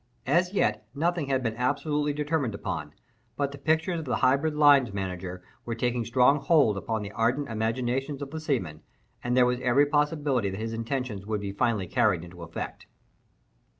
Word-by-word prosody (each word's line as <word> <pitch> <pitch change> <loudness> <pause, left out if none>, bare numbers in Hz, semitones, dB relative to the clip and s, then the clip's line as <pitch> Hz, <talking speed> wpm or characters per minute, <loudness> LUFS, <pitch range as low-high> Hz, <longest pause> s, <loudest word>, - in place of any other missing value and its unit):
As 175 +7 +2
yet, 110 - 0
nothing 170 0 0
had 135 -1 0
been 115 -2 -1
absolutely 145 +3 0
determined 145 -6 -1
upon; - - -4 0.5
but 140 -1 0
the 140 - -10
pictures 160 +4 +1
of 160 - -6
the 125 - 0
hybrid 140 +4 +2
line 145 -4 +6
manager 90 -1 -5 0.2
were 115 - -4
taking 120 0 -1
strong 125 +5 +4
hold 140 -8 +4
upon 110 +2 -3
the 100 - -6
ardent 120 +7 0
imaginations 125 +5 -1
of 140 - -8
the 160 - -4
seamen, 115 - -2 0.4
and 125 +1 0
there 125 - +6
was 125 0 0
every 125 +3 +4
possibility 145 -6 +1
that 95 +1 -5
his 115 +1 -3
intentions 115 -3 -3
would 105 -2 -1
be 100 -1 -4
finally 105 -1 0
carried 80 - +1
into 90 0 -11
effect. 85 0 -7
125 Hz, 180 wpm, -27 LUFS, 110-145 Hz, 0.5 s, line